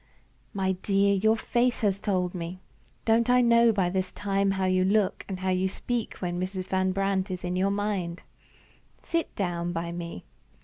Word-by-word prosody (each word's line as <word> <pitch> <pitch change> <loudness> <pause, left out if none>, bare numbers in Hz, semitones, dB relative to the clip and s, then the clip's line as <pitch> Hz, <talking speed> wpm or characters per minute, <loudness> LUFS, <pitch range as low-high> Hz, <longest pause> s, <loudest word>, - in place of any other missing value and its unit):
"My 190 -2 0
dear, 200 0 +3
your 220 +3 +3
face 245 +2 0
has 200 -3 +1
told 185 -3 0
me. 175 0 -5 0.5
Don't 230 +1 +3
I 250 0 +5
know 235 -1 +5
by 190 -4 +1
this 185 0 -1
time 200 -1 0
how 190 -1 0
you 185 0 +2
look 200 +1 +1
and 190 -1 -4
how 190 - 0
you 185 +1 +1
speak 240 +3 -3
when 175 -1 -3
Mrs. 185 0 -3
Van 190 0 +1
Brandt 195 0 0
is 185 -1 -5
in 180 0 -2
your 190 +2 +2
mind. 200 -4 -2 0.8
Sit 335 -1 -2
down 175 -3 -2
by 170 0 -3
me. 170 - -6
190 Hz, 180 wpm, -27 LUFS, 185-205 Hz, 0.8 s, I